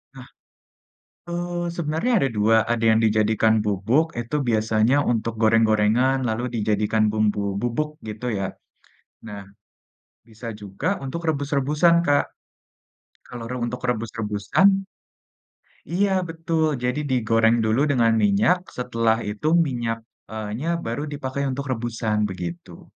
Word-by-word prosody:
Nah, - - -11 1.0
eee, 175 0 -3
sebenarnya 165 +9 -1
ada 135 - +1
2, 110 +2 +4 0.2
ada 115 -1 -1
yang 110 0 +4
dijadikan 110 0 +3
bubuk 110 - +1
itu 120 +5 -3
biasanya 110 +3 +2 0.2
untuk 115 0 -2
goreng-gorengan 110 +3 +3
lalu 110 +3 -2
dijadikan 105 0 +1
bumbu 105 -2 0
bubuk, 150 +6 -2
gitu 110 +3 -6
ya. 95 - -1 0.8
Nah, 105 -2 -7 0.9
bisa 115 +1 -8
juga 100 - -4 0.2
untuk 170 +6 -5
rebus-rebusan, 145 +3 +2
Kak, 145 -3 +3 1.0
kalau 120 -2 -8
re 125 - -3
untuk 120 +1 -3
rebus-rebusan 115 - +1 1.0
iya, 190 +1 +1
betul! 160 -2 -1
Jadi, 125 +3 -2
digoreng 115 -2 +2
dulu 120 +7 +2
dengan 120 -5 +3
minyak 105 - +2
setelah 115 -2 -1
itu 105 +9 -2
minyak 120 -8 0 0.3
eee, 110 -1 -5
nya, 160 - -3
baru 145 -3 -4
dipakai 140 -1 -4
untuk 135 +1 -3
rebusan, 110 -3 -1
begitu. 85 -2 -7
115 Hz, 120 wpm, -23 LUFS, 110-145 Hz, 1.0 s, 2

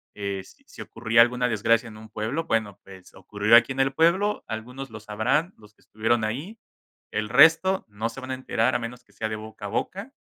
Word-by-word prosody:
Eh, 100 -2 -4
si - - -15
ocurría 115 0 +2
alguna 125 +1 +3
desgracia 115 +1 +2
en 105 - -12
un 110 0 -13
pueblo, 110 +10 -3
bueno, 110 -6 -1
pues 95 -2 -15
ocurrió 105 +4 +2
aquí 120 +2 +6
en 135 - -7
el 135 0 +1
pueblo, 180 +7 +2
algunos 125 +5 -7
lo 110 - -8
sabrán, 110 - -1
los 105 -1 -18
que - - -30
estuvieron 110 +1 -1
ahí, 140 - -4 0.5
el 105 0 -2
resto 165 +9 +5
no 105 +2 -3
se 115 - -9
van 130 0 -6
a - - -1
enterar 130 -1 0
a - - +1
menos 120 +1 -7
que 100 - -28
sea 110 +2 -4
de 110 - -3
boca 110 -1 -10
a - - -2
boca. 195 - -4
115 Hz, 215 wpm, -25 LUFS, 110-135 Hz, 0.5 s, aquí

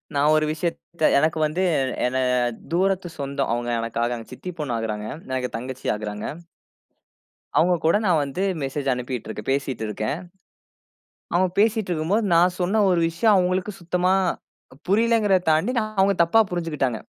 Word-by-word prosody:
நான் 145 +2 +3
ஒரு 155 0 +2
விஷயத்த 170 0 -1
எனக்கு 155 +2 +1
வந்து 160 +5 -2 0.4
என 125 +1 -1 0.6
தூரத்து 185 0 +1
சொந்தம். 140 -3 -2
அவுங்க 120 0 -2
எனக்காக 115 +1 -2
சித்தி 180 - -7
பொண்ணு 140 -6 -2
ஆகுறாங்க. 110 -1 -3 0.2
எனக்கு 130 -1 -2
தங்கச்சி 130 +2 -7
ஆகுறாங்க. 105 0 -5 1.3
அவுங்க 175 +2 +4
கூட 165 +5 +4
நான் 165 -4 +3
வந்து 140 +8 -4 0.2
மெசேஜ் 135 0 -2
அனுப்பிட்டு 125 -2 -4
இருக்கேன். 110 +3 -7
பேசிட்டு 135 -5 -2
இருக்கிறேன். 110 +10 -3 1.1
அவுங்க 180 +1 +3
பேசிட்டு 220 -2 +2
இருக்கும்போது, 175 +7 0
நான் 180 +1 +4
சொன்ன 200 +5 +2
ஒரு 180 -2 +3
விஷயம் 205 +5 +3
அவங்களுக்கு 185 +2 0
சுத்தமா 180 +2 +1 0.7
புரியலேங்கிறத 210 -3 +3
தாண்டி, 160 +11 +2
நான் 215 -1 -4
அவுங்க 195 0 +2
தப்பா 225 +7 +5
புரிஞ்சுக்கிட்டாங்க. 150 -9 -1
160 Hz, 140 wpm, -23 LUFS, 130-185 Hz, 1.3 s, தப்பா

